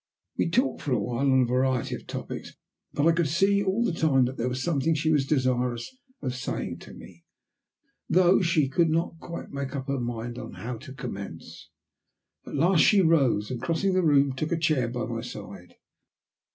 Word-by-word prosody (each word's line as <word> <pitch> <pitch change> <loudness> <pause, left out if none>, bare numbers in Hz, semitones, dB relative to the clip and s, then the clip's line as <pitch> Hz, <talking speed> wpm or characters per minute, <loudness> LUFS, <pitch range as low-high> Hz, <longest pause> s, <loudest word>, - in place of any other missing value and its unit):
We - - 0
talked 250 +10 +1
for 140 - -1
a - - +2
while 125 +3 0
on 130 0 +5
a - - +2
variety 130 0 0
of - - -7
topics, - - -6 0.4
but 145 - 0
I 165 - +6
could 165 -1 +1
see 195 +6 +2
all 200 +4 +1
the 180 - 0
time 140 -6 +3
that 130 +2 -4
there 125 0 -1
was 130 +1 -3
something 160 -1 +1
she 155 +1 +1
was 140 -3 +2
desirous 125 - 0 0.3
of 130 -2 -2
saying 125 - -4
to - - -12
me, 85 -2 -14 0.9
though 185 +2 +5
she 170 -5 +2
could 165 +5 +2
not 165 +1 -1
quite 170 0 -8
make 140 0 -4
up 135 -1 -4
her 140 -1 0
mind 120 0 -4 0.2
how 120 +1 -5
to 130 - -11
commence. 85 - -8 0.8
At - - -6
last 175 -1 +4
she 205 -2 +5
rose, 135 - +2
and 125 -2 -4
crossing 165 +8 0
the 185 - +3
room 140 -4 +3
took 155 +5 -3
a 170 - +1
chair 155 -6 +1
by 120 +1 -3
my 115 -1 -4
side. 100 -6 -9
135 Hz, 195 wpm, -27 LUFS, 125-165 Hz, 0.9 s, I